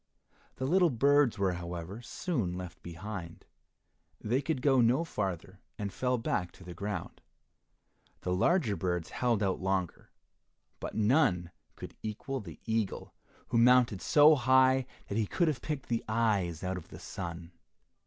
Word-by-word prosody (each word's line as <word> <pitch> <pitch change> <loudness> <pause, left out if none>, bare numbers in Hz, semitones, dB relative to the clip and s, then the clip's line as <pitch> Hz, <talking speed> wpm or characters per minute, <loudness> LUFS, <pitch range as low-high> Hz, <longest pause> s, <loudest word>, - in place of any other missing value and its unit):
The 130 - -3
little 175 +4 +4
birds 140 0 +3
were, 95 -2 +1
however, 90 +4 -6
soon 120 - -2
left 90 -1 -8
behind. 85 0 -7 0.7
They 125 +5 0
could 140 -3 -2
go 135 -3 +5
no 125 +7 +3
farther, 95 - -4 0.2
and 100 -3 -4
fell 125 +5 0
back 90 -6 -1
to - - -15
the 90 -1 -8
ground. 95 0 -5 1.0
The 90 - -1
larger 115 - +2
birds 90 -1 -2
held 120 -4 +1
out 95 -1 0
longer, 95 -2 -2 0.7
but - - -6
none 105 - +2 0.2
could - - -9
equal 120 +6 -4
the 85 -8 -10
eagle, 110 -3 -2 0.4
who 115 - +2
mounted 120 -4 +5
so 150 +1 +6
high 130 -1 +4 0.2
that 100 - -1
he 110 - 0
could 170 - +1
have 145 -6 -1
picked 150 -4 -4
the 115 -1 -1
eyes 100 -7 0
out 95 0 -2
of 85 - -9
the - - -11
sun. 85 -2 -7
105 Hz, 155 wpm, -31 LUFS, 90-130 Hz, 1.0 s, so